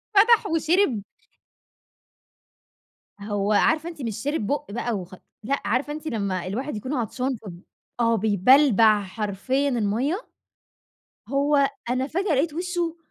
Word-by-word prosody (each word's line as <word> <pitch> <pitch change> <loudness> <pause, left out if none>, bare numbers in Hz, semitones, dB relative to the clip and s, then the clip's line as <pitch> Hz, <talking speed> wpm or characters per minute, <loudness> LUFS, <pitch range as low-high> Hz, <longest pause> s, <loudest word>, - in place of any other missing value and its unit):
فتح 450 +3 +6
وشِرِب 320 - +1 2.2
هو 205 0 -1
عارفة 315 +9 +2
أنتِ 330 -4 -8
مش 225 -4 -3
شِرِب 290 -7 -1
بُق 290 0 -2
بقى 240 +1 -2
وخ 185 0 -9 0.3
لأ 275 +5 -1
عارفة 255 +7 0
أنتِ 310 +1 -8
لمّا 195 - -2
الواحد 250 +7 -4
يكون 255 +7 -4
عطشان 255 +1 -2
فب 185 -5 -11 0.4
آه 230 -1 +3
بيبلبع 220 +1 +4
حرفيًا 210 +7 -2
المَيَّة؟ 250 - -1 1.0
هو 280 +1 +2 0.2
أنا 255 +2 0
فجأة 360 +2 0
لقيت 295 +4 +1
وشه 345 -1 -2
255 Hz, 125 wpm, -24 LUFS, 210-300 Hz, 2.2 s, فتح